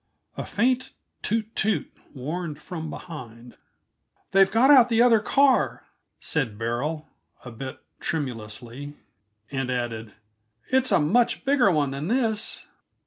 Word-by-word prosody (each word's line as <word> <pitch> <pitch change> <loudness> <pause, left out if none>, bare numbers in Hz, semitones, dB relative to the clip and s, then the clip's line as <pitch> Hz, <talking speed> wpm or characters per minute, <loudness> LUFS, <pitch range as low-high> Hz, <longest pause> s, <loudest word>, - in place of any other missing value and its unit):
A - - -4
faint 255 +4 0 0.3
toot 220 0 -2
toot 215 -1 0 0.2
warned 150 +3 -4
from 160 -1 -6
behind. 120 -9 -9 0.8
"They've 195 0 +5
got 245 +6 +5
out 250 -4 +8
the 230 -1 +2
other 235 -2 +6
car," 270 +4 +2 0.3
said 125 -9 -2
Beryl, 130 +8 -2 0.4
a 125 - -7
bit 130 +3 -7 0.2
tremulously; 125 0 -5 0.6
and 135 -2 -2
added, 115 -4 -3 0.6
"it's 260 0 +2
a - - +5
much 230 - +2
bigger 270 -6 +4
one 150 -6 +1
than 140 +4 -4
this." 225 -2 0
160 Hz, 125 wpm, -25 LUFS, -, 0.8 s, out